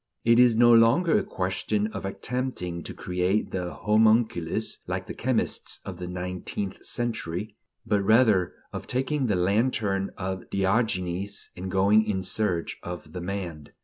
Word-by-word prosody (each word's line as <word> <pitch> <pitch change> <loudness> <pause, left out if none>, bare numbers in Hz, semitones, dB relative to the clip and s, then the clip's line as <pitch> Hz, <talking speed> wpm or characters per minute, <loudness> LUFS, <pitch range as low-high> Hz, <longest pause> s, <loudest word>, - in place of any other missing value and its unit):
It 115 +1 +5
is 125 -2 +6
no 120 +1 +6
longer 115 +10 +5
a - - -2
question 95 +3 -1
of - - -5
attempting 95 -5 -3
to - - -5
create 90 +3 -1
the 90 -2 -3
homunculus, 110 -5 +2
like - - -3
the - - -6
chemists - - -1
of 95 -3 -6
the 90 0 -6
nineteenth 90 +2 -4
century; 105 -4 -3 0.3
but 105 -1 +2
rather 105 -4 +4 0.2
of - - -6
taking 135 +2 0
the 105 - +2
lantern 100 +1 +1
of 95 -1 -4
Diogenes 95 -1 -1
and 95 +1 -5
going 100 +4 +4
in 100 -3 -2
search 90 -3 -1
of 90 0 -8
the 90 - -5
man. 85 -5 -5
100 Hz, 145 wpm, -26 LUFS, 90-110 Hz, 0.3 s, is